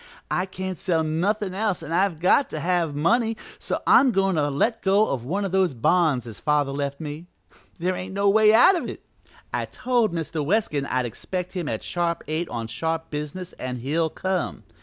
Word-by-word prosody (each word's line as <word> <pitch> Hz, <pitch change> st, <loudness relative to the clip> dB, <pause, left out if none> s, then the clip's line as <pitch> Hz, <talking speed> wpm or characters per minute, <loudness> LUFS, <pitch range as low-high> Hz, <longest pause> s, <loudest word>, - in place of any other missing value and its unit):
I 180 Hz, +1 st, 0 dB
can't 185 Hz, -1 st, -5 dB
sell 165 Hz, -3 st, +1 dB
nothin' 185 Hz, +5 st, 0 dB
else 205 Hz, -1 st, -1 dB
an' 155 Hz, -, -7 dB
I've 180 Hz, -1 st, +1 dB
got 185 Hz, -, +3 dB
to 155 Hz, -, -4 dB
have 170 Hz, -2 st, 0 dB
money, 225 Hz, +9 st, +2 dB, 0.2 s
so -, -, -3 dB
I'm 270 Hz, -, +6 dB
goin' 195 Hz, -3 st, +2 dB
to 150 Hz, -3 st, +1 dB
let 220 Hz, -, 0 dB
go 200 Hz, +3 st, +3 dB
of 120 Hz, -3 st, -3 dB
one 195 Hz, +9 st, -1 dB
of 195 Hz, -, -3 dB
those 185 Hz, -6 st, +2 dB
bonds 150 Hz, 0 st, +2 dB
as 115 Hz, -3 st, -8 dB
father 150 Hz, -2 st, +1 dB
left 140 Hz, 0 st, -3 dB
me. 155 Hz, +2 st, -6 dB, 0.5 s
There 180 Hz, +2 st, 0 dB
ain't 185 Hz, +1 st, -6 dB
no 200 Hz, 0 st, +2 dB
way 215 Hz, +1 st, +6 dB
out 245 Hz, -, +7 dB
of 345 Hz, -, -3 dB
it; -, -, -9 dB, 0.5 s
I -, -, -1 dB
told 245 Hz, -4 st, 0 dB
Mr. 165 Hz, -2 st, -3 dB
Weskin 150 Hz, -5 st, 0 dB
I'd 130 Hz, -1 st, 0 dB
expect 180 Hz, -, -5 dB
him 175 Hz, -5 st, -3 dB
at -, -, -3 dB
sharp 170 Hz, -1 st, -1 dB
eight 160 Hz, +2 st, -2 dB
on 115 Hz, -1 st, -4 dB
sharp 160 Hz, +8 st, -3 dB
business 150 Hz, +5 st, -5 dB
an' 125 Hz, 0 st, -3 dB
he'll 150 Hz, +7 st, 0 dB
come. 185 Hz, +2 st, -2 dB
175 Hz, 200 wpm, -24 LUFS, 150-195 Hz, 0.5 s, out